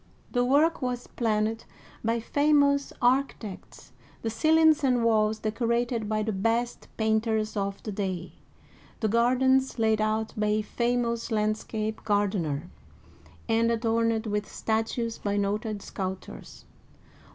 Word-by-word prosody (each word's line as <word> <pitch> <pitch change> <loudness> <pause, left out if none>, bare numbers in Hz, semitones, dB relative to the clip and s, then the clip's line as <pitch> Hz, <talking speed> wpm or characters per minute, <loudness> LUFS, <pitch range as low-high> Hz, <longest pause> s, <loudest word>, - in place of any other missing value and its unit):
The 245 -1 +2
work 295 +6 +3
was 250 -1 -2
planned 220 -1 -1 0.4
by 230 +1 +1
famous 285 +2 +2
architects, 245 -6 -1 0.3
the 225 - -1
ceilings 315 +3 +4
and 250 -3 +2
walls 220 -1 +2
deco 220 +2 -2
rated 235 -2 0
by 215 0 0
the 220 - -1
best 230 +4 -1
painters 220 0 0
of 200 -1 -3
the 215 - -4
day, 190 -3 -3 0.7
the 220 - +1
gardens 255 +4 +3
laid 220 -1 +2
out 215 0 0
by 210 0 0
a 210 +1 +2
famous 235 +1 -1
landscape 215 0 -2
gardener, 190 -7 0 0.8
and 230 +1 +2
adorned 230 0 +1
with 210 -1 -2
statues 225 +1 -2
by 205 0 -1
noted 205 +1 -2
sculptors. 190 -1 -7
225 Hz, 125 wpm, -27 LUFS, 215-240 Hz, 0.8 s, ceilings